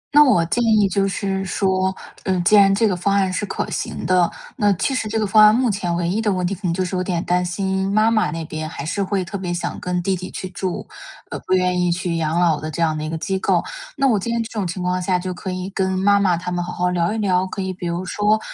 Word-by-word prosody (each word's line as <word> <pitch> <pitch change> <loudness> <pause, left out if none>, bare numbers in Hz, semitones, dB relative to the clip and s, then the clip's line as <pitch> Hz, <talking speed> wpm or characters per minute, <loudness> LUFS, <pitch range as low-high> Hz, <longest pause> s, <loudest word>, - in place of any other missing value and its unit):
那 295 - +9
我 180 - +3
建 235 +8 0
议 215 -3 +4
就 195 +1 +1
是 195 -1 -2
说， 190 0 0 0.3
呃， 185 -1 0
既 210 - +5
然 195 -1 +6
这 220 +2 +3
个 185 - 0
方 195 +3 0
案 190 -2 +1
是 195 - -1
可 - - -3
行 - - -4
的， 180 -2 +3 0.3
那 205 -1 +3
其 230 +9 -1
实 255 -4 -1
这 220 +1 -1
个 215 - +1
方 215 +1 +6
案 210 0 +8
目 245 -2 +2
前 180 -3 -2
唯 170 0 -1
一 200 +6 0
的 210 - +1
问 185 -2 -1
题 180 - -1
可 195 - -8
能 170 - +1
就 185 +1 -1
是 185 - -4
有 185 - 0
点 180 -2 -2
担 180 0 +1
心 190 +2 -1
妈 215 +2 +3
妈 215 -1 +2
那 165 -1 -4
边 155 0 -5
还 145 - -7
是 200 +5 -2
会 195 -1 -1
特 200 +3 -5
别 180 -2 -3
想 175 0 -3
跟 180 0 -2
弟 190 +1 +1
弟 185 0 -7
去 185 - -6
住， 185 -1 -4 0.4
呃， - - -4
不 - - +1
愿 180 -1 +2
意 175 -1 +2
去 175 0 -2
养 160 +1 0
老 165 -4 +3
的 155 - -4
这 155 - -6
样 160 -2 +2
的 155 - -4
一 155 - -3
个 160 - -3
机 190 +4 -2
构。 - - +1 0.3
那 275 - +3
我 225 -6 +3
建 230 +5 -3
议 - - 0
这 225 - -7
种 210 -5 -2
情 180 +1 -4
况 180 0 0
下 180 0 +1
就 180 +1 -4
可 185 +2 -6
以 185 0 -4
跟 190 -1 0
妈 200 +1 +4
妈 185 -4 +2
他 180 +1 -5
们 175 0 -1
好 180 - -5
好 180 0 0
聊 175 +1 +1
一 225 - -2
聊， 190 -3 +1
可 195 - -7
以 190 0 -3
比 180 -1 -6
如 170 +2 -3
说， 210 +3 +1
185 Hz, 315 characters per minute, -21 LUFS, 175-200 Hz, 0.4 s, 那